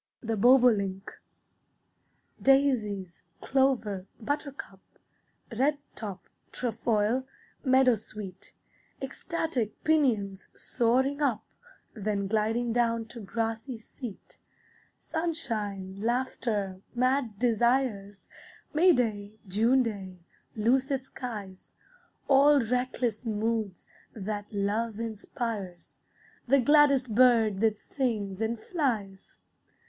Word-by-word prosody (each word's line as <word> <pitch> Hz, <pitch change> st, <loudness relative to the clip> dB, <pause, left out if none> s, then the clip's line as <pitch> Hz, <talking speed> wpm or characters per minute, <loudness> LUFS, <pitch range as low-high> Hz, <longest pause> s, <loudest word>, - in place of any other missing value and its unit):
THE 225 Hz, -2 st, -2 dB
BOBOLINK 210 Hz, -5 st, +4 dB, 1.3 s
Daisies, 215 Hz, -, +2 dB, 0.2 s
clover, 240 Hz, -8 st, +1 dB
buttercup, 275 Hz, -5 st, -4 dB, 0.8 s
Redtop, 255 Hz, -7 st, -2 dB, 0.3 s
trefoil, 230 Hz, +1 st, 0 dB, 0.4 s
meadowsweet, 225 Hz, -7 st, +1 dB, 0.5 s
Ecstatic 270 Hz, -, -3 dB
pinions, 225 Hz, -11 st, +1 dB
soaring 260 Hz, +5 st, +1 dB
up, 235 Hz, -7 st, +1 dB, 0.5 s
Then 205 Hz, -2 st, -2 dB
gliding 225 Hz, +3 st, 0 dB
down 230 Hz, -1 st, +1 dB
to 235 Hz, -, -9 dB
grassy 225 Hz, +3 st, -3 dB
seat. 225 Hz, -1 st, -10 dB, 0.6 s
Sunshine, 215 Hz, -, -3 dB
laughter, 220 Hz, -5 st, -1 dB
mad 250 Hz, -3 st, +1 dB
desires, 230 Hz, -3 st, +1 dB, 0.5 s
May 345 Hz, +4 st, +6 dB
day, 210 Hz, -6 st, -1 dB
June 230 Hz, +7 st, +3 dB
day, 195 Hz, -5 st, -5 dB, 0.4 s
lucid 260 Hz, +4 st, +1 dB
skies, 205 Hz, -9 st, -8 dB, 0.5 s
All 285 Hz, +1 st, +6 dB
reckless 245 Hz, -1 st, -1 dB
moods 215 Hz, -2 st, -2 dB, 0.3 s
that 205 Hz, 0 st, -5 dB
love 210 Hz, +2 st, -1 dB
inspires 220 Hz, -4 st, -5 dB, 0.5 s
The 275 Hz, +3 st, +5 dB
gladdest 280 Hz, -3 st, +4 dB
bird 225 Hz, -4 st, +4 dB
that 220 Hz, -1 st, +2 dB
sings 215 Hz, -6 st, -2 dB
and 225 Hz, +1 st, -1 dB
flies. 220 Hz, -, -3 dB
230 Hz, 80 wpm, -28 LUFS, 205-260 Hz, 1.3 s, May